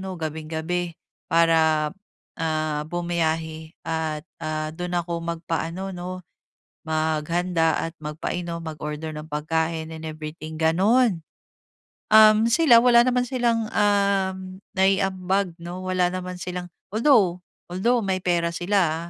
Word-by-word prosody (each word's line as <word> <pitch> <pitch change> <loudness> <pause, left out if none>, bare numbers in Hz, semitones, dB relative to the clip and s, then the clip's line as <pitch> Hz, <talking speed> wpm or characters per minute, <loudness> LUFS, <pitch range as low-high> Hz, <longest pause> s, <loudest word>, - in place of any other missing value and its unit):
'no 190 -1 -5
gabing-gabi 160 +2 -3 0.3
para, 160 -2 +3 0.5
ah, 155 -2 -1
bumiyahe 160 -2 -2
at, 160 -1 -2 0.2
ah, 155 0 -3
doon 175 +2 -3
ako 170 0 -4
magpa-ano 170 +3 -3
'no, 180 +1 -6 0.6
maghanda 160 +1 0
at - - -25
magpainom, 170 +3 -4
mag-order 155 0 -5
ng 150 +1 -8
pagkain 160 +2 -1
and 160 0 -8
everything, 155 0 -7
ganon. 185 +4 +3 0.9
Um, 215 0 +8
sila 240 -5 +6
wala 240 0 +6
naman 250 0 +2
silang 235 -3 0
uhm, 195 -2 +1 0.2
naiambag 190 -1 +1
'no, 175 +2 -6
wala 185 -1 +2
naman 185 0 -5
silang, 180 0 -4 0.2
although, 215 -6 +4 0.3
although 235 +7 +2
may 190 -1 0
pera 175 -2 +1
sila, 170 -2 0
175 Hz, 115 wpm, -24 LUFS, 160-190 Hz, 0.9 s, Um